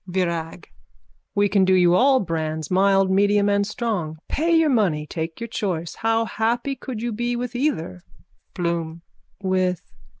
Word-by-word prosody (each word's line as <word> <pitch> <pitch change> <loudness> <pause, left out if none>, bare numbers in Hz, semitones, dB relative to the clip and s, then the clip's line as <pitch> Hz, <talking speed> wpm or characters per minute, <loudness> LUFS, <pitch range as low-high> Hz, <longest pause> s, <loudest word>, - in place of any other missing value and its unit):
VIRAG: 170 -2 -3 0.6
We 205 0 +3
can 200 -1 +3
do 190 0 +4
you 175 -1 +4
all 260 +6 +4
brands, 160 -3 -3
mild, 195 0 +3
medium 205 +1 +3
and 200 0 +1
strong. 205 -9 -3
Pay 325 +3 -1
your 325 -2 +4
money, 180 -11 +1
take 160 +1 -5
your 230 - -4
choice. 180 -7 -3
How 225 0 0
happy 240 +5 -1
could 245 -3 -6
you 240 - -1
be 240 +2 -2
with 245 0 -4
either... 245 - -2 0.5
BLOOM: 170 -1 -3 0.4
With...? 185 -2 0
195 Hz, 155 wpm, -23 LUFS, 170-230 Hz, 0.6 s, do